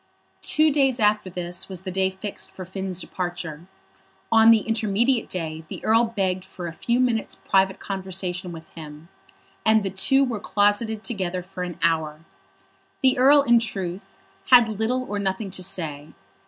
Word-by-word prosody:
Two 310 0 +3
days 270 -3 +2
after 210 -2 +2
this 175 0 -4
was 185 -2 -5
the 190 -1 -5
day 190 +1 +1
fixed 190 +2 -6
for 185 - -9
Finn's 190 0 -5
departure. 175 -3 -5 0.6
On 225 0 +7
the 225 -2 +6
intermediate 225 +3 0
day 160 -3 -4
the - - -8
Earl 225 +2 +4
begged 190 -5 -1
for 185 -1 -9
a 165 - -5
few 235 +8 -1
minutes' 240 -3 0
private 190 0 +1
conversation 190 -2 -4
with 160 -1 -11
him, 155 0 -11 0.5
and 220 -1 +4
the 195 - -2
two 270 +8 +3
were 240 -5 -2
closeted 210 +2 0
together 185 -5 -3
for 185 0 -9
an 180 -2 -4
hour. 160 -1 0 0.8
The 260 -1 +4
Earl, 280 +2 +6
in 240 -3 +5
truth, 195 -4 -5 0.3
had 245 -3 +8
little 220 +4 -1
or 205 -5 -4
nothing 195 0 -2
to 185 - -4
say. 155 -5 -3
195 Hz, 165 wpm, -24 LUFS, 180-225 Hz, 0.8 s, had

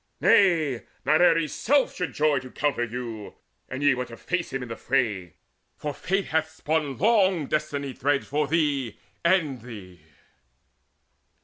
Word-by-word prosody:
Nay, 160 - +4 0.2
Not 155 +4 +4
Ares' 165 -3 +3
self 280 +2 +2
should 180 - -3
joy 150 -2 +2
to 130 - -10
encounter 135 -1 -1
you, 115 -3 -7 0.3
An 130 +3 -4
ye 145 -1 +5
would 125 -1 -3
face 180 -1 -2
him 135 -1 -3
in 125 - -8
the 115 - -4
fray; 105 - -1 0.4
for 150 -1 -4
Fate 195 +5 -1
Hath 160 0 0
spun 155 -4 -2
long 195 -6 +3
destiny 145 -2 -2
threads 140 +3 0
for 150 +2 -1
thee 145 -8 0 0.3
and 165 - +2
thee." 100 -8 -11
145 Hz, 145 wpm, -25 LUFS, 125-165 Hz, 0.4 s, ye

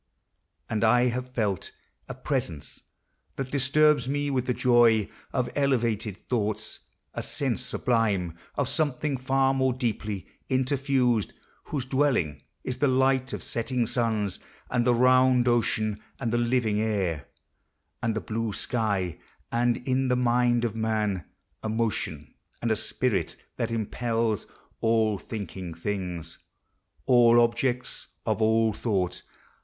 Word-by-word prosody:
And 110 -1 -1
I 125 +2 +5
have 125 +1 -3
felt 105 -7 -1 0.4
A - - -5
presence 75 -3 -3 0.5
that 135 -1 -4
disturbs 140 0 +3
me 145 0 0
with 130 -2 -1
the 125 - +2
joy 120 -4 +4 0.2
Of 125 -1 -1
elevated 115 -7 0
thoughts; 110 -3 -2 0.3
a - - -3
sense 130 -3 -1
sublime 105 -9 0 0.2
Of 140 - 0
something 145 -1 0
far 135 +1 +2
more 130 -1 +2
deeply 110 -6 -3 0.2
interfused. 130 -3 +1 0.3
Whose 135 -4 -3
dwelling 130 - +1 0.2
is 125 - -3
the 145 - +2
light 130 0 +2
of - - -4
setting 120 +1 -1
suns, 110 -5 -1 0.3
And 125 0 +1
the 120 - +5
round 130 0 +4
ocean, 110 -3 +1 0.2
and 120 -3 -2
the 120 - +2
living 120 -3 +1
air, 95 -9 -1 0.7
And 115 -1 0
the 110 - -1
blue 115 -1 -3
sky, 100 -7 -1 0.3
and 120 0 +2
in 130 0 +1
the 125 - +2
mind 120 -1 +2
of 115 -2 -2
man: 110 -5 -1 0.4
A 110 - -3
motion 105 - -2 0.3
and 115 - -1
a - - +3
spirit, 110 +2 -1 0.2
that 115 - -1
impels 115 0 -1 0.3
All 110 -3 +2
thinking 95 -5 -6
things, 90 -2 -4 0.7
all 120 -2 +6
objects 120 +1 0 0.2
of - - 0
all 110 0 +3
thought. 100 -5 -1
120 Hz, 130 wpm, -27 LUFS, 110-130 Hz, 0.7 s, all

